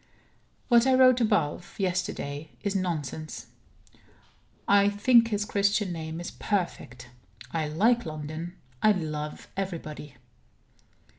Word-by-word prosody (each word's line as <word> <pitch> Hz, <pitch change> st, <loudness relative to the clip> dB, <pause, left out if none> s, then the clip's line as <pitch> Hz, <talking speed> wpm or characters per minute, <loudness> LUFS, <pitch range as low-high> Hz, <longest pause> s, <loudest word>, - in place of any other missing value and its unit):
What 240 Hz, 0 st, +5 dB
I 260 Hz, -, +5 dB
wrote 255 Hz, -1 st, +6 dB
up 230 Hz, -, +4 dB
above, 165 Hz, -1 st, -1 dB
yesterday, 175 Hz, -5 st, -2 dB
is 200 Hz, -1 st, -1 dB
nonsense. 160 Hz, -4 st, -3 dB, 1.2 s
I 200 Hz, 0 st, +5 dB
think 230 Hz, +3 st, +4 dB
his 210 Hz, -2 st, -1 dB
Christian 200 Hz, -1 st, +1 dB
name 160 Hz, 0 st, -5 dB
is 175 Hz, -, -6 dB
perfect. 125 Hz, -, -3 dB, 0.4 s
I 160 Hz, -2 st, -1 dB
like 225 Hz, +11 st, +2 dB
London. 155 Hz, +2 st, -6 dB, 0.3 s
I 215 Hz, -, +5 dB
love 150 Hz, -4 st, -4 dB
everybody. 160 Hz, -7 st, -5 dB
180 Hz, 115 wpm, -27 LUFS, 155-205 Hz, 1.2 s, wrote